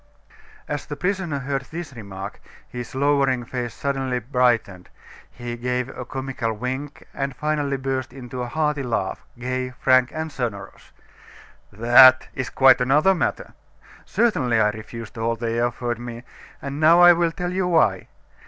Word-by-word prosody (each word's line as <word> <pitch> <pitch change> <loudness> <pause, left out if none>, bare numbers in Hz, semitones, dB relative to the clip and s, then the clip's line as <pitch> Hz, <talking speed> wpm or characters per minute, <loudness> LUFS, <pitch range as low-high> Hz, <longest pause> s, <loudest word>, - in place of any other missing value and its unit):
As 145 -1 -4
the 145 - -5
prisoner 180 -1 -2
heard 135 0 -2
this 165 -3 -7
remark, 100 -4 -8 0.3
his 125 +2 -8
lowering 135 -3 +2
face 120 -1 -4
suddenly 135 -2 -2
brightened, 120 -7 0 0.4
he 120 -1 -7
gave 125 +1 -2
a 130 - -7
comical 130 -4 -3
wink, 130 +6 -5
and 135 -1 -3
finally 145 -1 -1
burst 130 -1 -3
into 125 -1 -7
a 125 - -3
hearty 150 +2 -1
laugh, 115 -7 -2
gay, 130 +1 -3
frank, 130 0 +3
and 160 0 -4
sonorous. 110 -8 -6 0.8
"That," 125 +4 +7
said - - -19
he, - - -3
"is 130 - -5
quite 130 -1 +5
another 150 +9 +4
matter. 180 - -2 0.5
Certainly, 130 - +1
I 105 -1 +4
refused 115 +1 -9
all 115 +1 0
they 115 0 -2
offered 120 -1 -2
me, 120 0 -7 0.4
and 140 +1 -5
now 165 +2 +6
I 175 0 +9
will 170 -1 +1
tell 180 +1 -4
you 185 -1 0
why. 155 - +2
130 Hz, 155 wpm, -23 LUFS, 120-145 Hz, 0.8 s, I